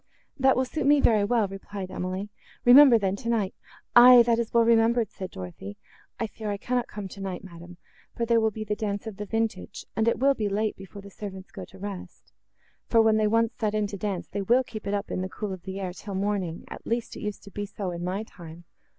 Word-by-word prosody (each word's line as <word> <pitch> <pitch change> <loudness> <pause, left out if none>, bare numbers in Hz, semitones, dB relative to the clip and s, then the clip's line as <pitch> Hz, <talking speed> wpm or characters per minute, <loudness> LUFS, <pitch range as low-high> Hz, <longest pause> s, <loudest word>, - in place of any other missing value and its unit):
"That 265 -1 +3
will 260 - +2
suit 275 +1 -2
me 290 0 +6
very 220 -6 +4
well," 220 0 +2
replied 195 -1 -7
Emily: 185 +2 -4 0.4
"Remember, 250 0 +9
then, 195 -2 0
tonight—" 220 -2 -1 0.4
"Aye, 245 0 +10
that 230 0 +2
is 230 -1 -2
well 235 0 +4
remembered," 230 -1 +3
said 185 -1 -7
Dorothée, 95 +2 -8 0.4
"I 230 - 0
fear 215 0 -6
I 205 - -2
cannot 245 +3 -1
come 205 -2 -7
tonight, 190 -1 -6
madam, 175 -1 -12 0.4
for 235 - 0
there 230 0 +3
will 220 - +3
be 215 0 -6
the 210 0 -2
dance 205 -1 -3
of 220 -3 -7
the 210 - -6
vintage, 225 -4 -3
and 220 +1 +1
it 230 - +2
will 275 +2 +4
be 215 -6 -2
late, 210 +2 -1
before 195 +1 -11
the 200 - -12
servants 190 -2 -8
go - - -8
to 190 - -16
rest; 195 -1 -9 0.5
for, 230 - +3
when 220 -1 +5
they 215 -1 +2
once 230 +2 +2
set 215 -2 0
in 210 -1 +1
to 200 0 -5
dance, 195 -2 -3
they 200 - -4
will 240 +6 +3
keep 215 -4 -8
it 200 - 0
up, 200 0 -4
in - - -2
the 185 - -3
cool 205 0 -5
of 185 - -8
the 190 +1 -6
air, 185 -2 -4
till 200 +1 -7
morning; 190 -4 -2
at - - -10
least, 235 0 -2
it - - -8
used 210 -1 -5
to 200 - -12
be 205 +2 -4
so 195 -2 -5
in 170 0 -5
my 185 +4 -2
time." 170 -5 -12
210 Hz, 240 wpm, -26 LUFS, 190-230 Hz, 0.5 s, Aye